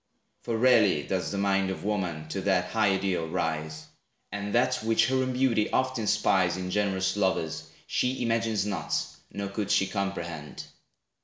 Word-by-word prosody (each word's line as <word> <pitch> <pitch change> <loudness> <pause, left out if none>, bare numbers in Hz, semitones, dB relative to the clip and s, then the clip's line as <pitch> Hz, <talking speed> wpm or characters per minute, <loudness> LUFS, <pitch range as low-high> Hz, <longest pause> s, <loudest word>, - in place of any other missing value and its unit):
For 115 -2 -2
rarely 110 - +4
does 95 +3 -2
the 100 - -3
mind 100 -1 +1
Of 95 - -5
woman 90 -7 -2
to 95 - -3
that 95 -2 +1
high 110 -3 +3
ideal 95 -4 -1
rise; 80 -1 -3 0.5
And 100 0 -4
that 120 - +3
which 110 0 +3
her 130 - +2
own 130 0 0
beauty 125 -4 +2
oft 130 -1 0
inspires 100 -4 +2
In 90 0 -4
generous 95 -2 0
lovers, 95 -5 -1 0.2
she 125 0 0
imagines 115 -2 0
not, 95 -7 -1 0.3
Nor 100 -1 -4
could 100 0 -3
she 95 - +3
comprehend. 85 -7 -4
100 Hz, 160 wpm, -28 LUFS, 95-110 Hz, 0.5 s, rarely